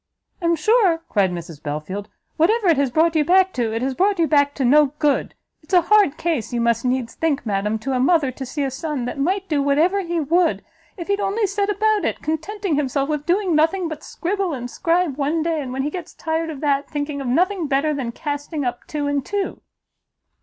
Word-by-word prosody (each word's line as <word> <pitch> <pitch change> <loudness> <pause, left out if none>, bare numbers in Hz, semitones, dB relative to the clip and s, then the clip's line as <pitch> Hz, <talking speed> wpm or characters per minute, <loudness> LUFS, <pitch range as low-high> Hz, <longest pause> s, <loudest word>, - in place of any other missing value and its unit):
"I - - -3
am 335 0 +3
sure," 360 -1 +3
cried 200 -3 +2
Mrs 170 -3 -7
Belfield, 155 +8 -5 0.3
"whatever 395 +5 +3
it 325 - +4
has 280 -1 +2
brought 325 +5 +2
you 310 - +4
back 375 +3 +4
to, 235 -3 -1
it 225 +2 -2
has 265 0 0
brought 390 +7 +2
you 335 - +3
back 285 -2 +3
to 270 - -1
no 290 +2 +5
good! 295 -2 0 0.3
it's 335 +4 -2
a 355 - +7
hard 405 -6 +4
case, 320 -10 -2
you 240 - -1
must 235 0 +1
needs 250 -2 -1
think, 295 -5 -1
madam, 210 +1 -1
to 265 +5 -3
a 255 - +1
mother, 280 0 +3
to 265 - -7
see 285 +3 -3
a 270 - -1
son 275 -1 -3
that 250 - -5
might 380 +7 0
do 300 -5 +1
whatever 315 +8 +2
he 345 -2 -2
would, 335 +3 +1 0.3
if 340 - -6
he'd 400 0 0
only 405 +2 0
set 405 +1 -1
about 425 -1 +1
it, - - -1
contenting 325 +2 -2
himself 275 0 0
with 300 -1 -2
doing 370 0 +2
nothing 330 +4 +2
but 315 -2 -6
scribble 375 -2 -2
and 245 -1 -6
scribe 335 -4 0
one 300 +3 0
day, 325 -2 -1
and 260 -3 -6
when 265 +1 -2
he 295 - -2
gets 355 -1 -7
tired 325 0 -2
of 300 -3 -7
that, 285 -1 0
thinking 290 -1 -3
of 270 - -4
nothing 360 +6 +1
better 285 +2 +1
than 260 -5 -3
casting 290 +1 -4
up 245 0 -4
two 295 -1 -3
and 285 -1 0
two!" 405 +3 -3
300 Hz, 225 wpm, -21 LUFS, 270-350 Hz, 0.3 s, a